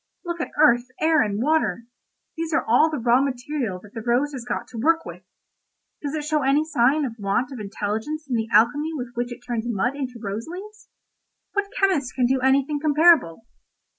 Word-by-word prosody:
Look 340 -1 -3
at - - -3
earth, 245 -5 +5
air, 315 -1 +4
and 205 -1 -1
water—these 310 +3 -3
are 325 - +1
all 250 +8 +4
the 305 - -3
raw 240 +1 +3
material 255 -6 -3
that 210 - -15
the 225 - -5
rose 245 +6 +1
has 255 -3 -6
got 240 0 -4
to 235 - -7
work 330 +4 +2
with; - - -9 0.8
does 290 0 -3
it 305 - -3
show 300 0 0
any 280 +3 +2
sign 285 0 +2
of 230 -3 -7
want 205 +6 -1
of 260 - -7
intelligence 215 +9 -4
in 260 - -4
the 225 -1 -1
alchemy 290 +9 +3
with 250 -4 -5
which 240 +1 -3
it 240 - -8
turns 235 -2 -3
mud 235 +4 0
into 255 -4 -5
rose 215 +3 -5
leaves? 425 +5 -10 0.6
What 405 0 -1
chemist 345 -10 +1
can 250 - +2
do 260 +2 +2
anything 275 +3 +2
comparable? 300 - +3
265 Hz, 195 wpm, -23 LUFS, 235-310 Hz, 0.8 s, earth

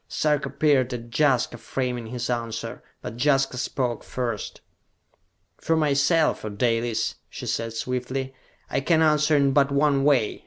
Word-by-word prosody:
Sarka 150 -1 0
peered 140 -4 +2
at 120 0 -9
Jaska, 130 -5 +2
framing 125 -2 -3
his 120 +1 -4
answer. 115 -2 -4 0.2
But 120 +3 -4
Jaska 135 -3 +2
spoke 125 -2 -2
first. 120 -5 -4 1.0
"For 165 - +1
myself, 155 +1 +2
O 110 - -3
Dalis," 115 +1 0
she - - -8
said 115 -1 -2
swiftly, 125 +3 -3 0.3
"I - - -1
can 160 +3 +3
answer 150 -1 +3
in 140 -1 +3
but 140 0 +3
one 140 -1 +2
way. 135 -7 +2
130 Hz, 145 wpm, -25 LUFS, 120-145 Hz, 1.0 s, can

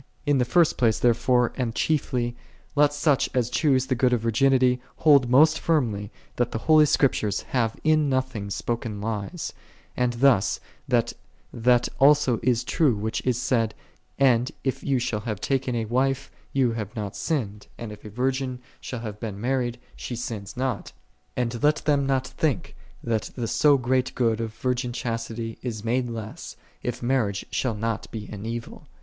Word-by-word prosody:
In 145 -2 +3
the 125 - +2
first 170 +4 +3
place, 115 -3 +3
therefore, 125 +1 +2
and 120 -3 -2
chiefly, 125 -6 0 0.4
let 145 0 +5
such 145 -1 +2
as 125 -2 +1
choose 135 -5 +2
the 130 - 0
good 125 0 +2
of 120 - +1
vir 115 0 0
ginity, 130 +1 +3 0.2
hold 140 -6 +5
most 155 +5 +5
firmly 115 -11 0 0.3
that 120 -1 +1
the - - -2
holy 155 +5 +5
Script 140 -2 +3
ures 105 -2 -2
have 115 -4 -1
in 155 -2 +3
nothing 130 -6 -1
spoken 115 0 -3
lies; 110 - -4 0.4
and, 125 -1 +1
thus, 120 -4 +3 0.3
that 120 -1 +1 0.4
that 120 +1 +3
also 140 -4 +5
is 120 -1 +1
true 150 -8 +2
which 110 +2 -2
is 125 -2 +2
said, 125 -4 0 0.4
"And 125 0 +3
if 130 - -1
thou 140 -2 +1
shalt 110 -3 -2
have 105 -4 -3
taken 135 -1 -1
a 115 -1 -1
wife, 135 +4 0 0.2
thou 130 -3 +3
hast 110 -3 -5
not 105 -3 -4
sinned; 105 -10 -3
and, 115 -2 -6
if 105 0 -11
a 105 - -8
virgin 130 +3 -1 0.2
shall 125 -3 -6
have 105 -2 -6
been 105 -4 -5
mar 130 +4 +1
ried, 120 -1 -3 0.2
she 120 - -5
sinneth 110 -2 -6
not." 130 0 -2 0.4
And 120 -1 -1
let 150 +1 +4
them 140 -2 +2
not 135 -1 +1
think 145 -7 -2 0.3
that 110 -3 -1
the 120 -3 -3
so 145 +5 +4
great 130 0 0
good 115 -2 +1
of 110 -1 -5
virgin 125 -1 -1
chastity 115 -1 -4
is 115 -3 -5
made 120 +1 0
less, 110 -2 -7 0.3
if 120 0 -4
marriage 115 -6 0
shall 125 -4 -1
not 115 +1 -3
be 110 -2 -7
an 105 +1 -6
evil. 115 0 -6
125 Hz, 180 wpm, -25 LUFS, 115-135 Hz, 0.4 s, let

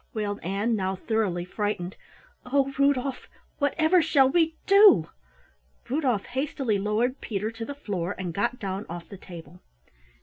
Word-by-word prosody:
wailed 205 -1 -2
Ann, 200 +6 0
now 190 -2 -1
thoroughly 190 -4 -1
frightened. 195 -2 -3 0.5
"Oh, 275 +1 +1
Rudolf, 275 -2 +1 0.3
whatever 315 +4 +3
shall 290 -4 +4
we 320 +3 +2
do?" 395 - +6 0.8
Rudolf 255 -7 0
hastily 260 -4 -1
lowered 220 +6 0
Peter 215 0 -3
to 225 0 -6
the 285 - -6
floor 200 -9 -3
and 180 -2 -4
got 235 +7 -1
down 195 0 -4
off 170 0 -7
the 195 - -9
table. 175 -2 -12
220 Hz, 140 wpm, -26 LUFS, 190-275 Hz, 0.8 s, do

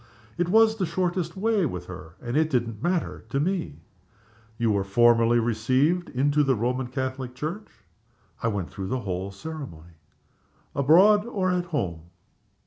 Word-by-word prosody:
"It 175 0 -1
was 220 +2 +5
the 190 -4 -1
shortest 175 0 -2
way 215 0 +1
with 90 - -3
her 90 -2 -10
and 120 0 -5
it 155 +1 +3
didn't 115 -5 -1
matter 175 +1 -1
to 140 - -1
me." 165 - -2 0.8
"You 115 -1 +1
were 100 -1 +1
formally 115 +3 +4
received 130 +9 +1
into 145 +3 +2
the 135 -2 +2
Roman 125 +3 -1
Catholic 130 0 -4
Church?" 165 +10 -5 0.7
"I - - 0
went 100 -5 -2
through 95 -1 -5
the 130 +5 -2
whole 95 -1 -3
ceremony." 100 - -9 0.8
"Abroad 195 - +5
or 190 -6 0
at 180 -1 0
home?" 90 - -3
130 Hz, 150 wpm, -25 LUFS, 110-175 Hz, 0.8 s, was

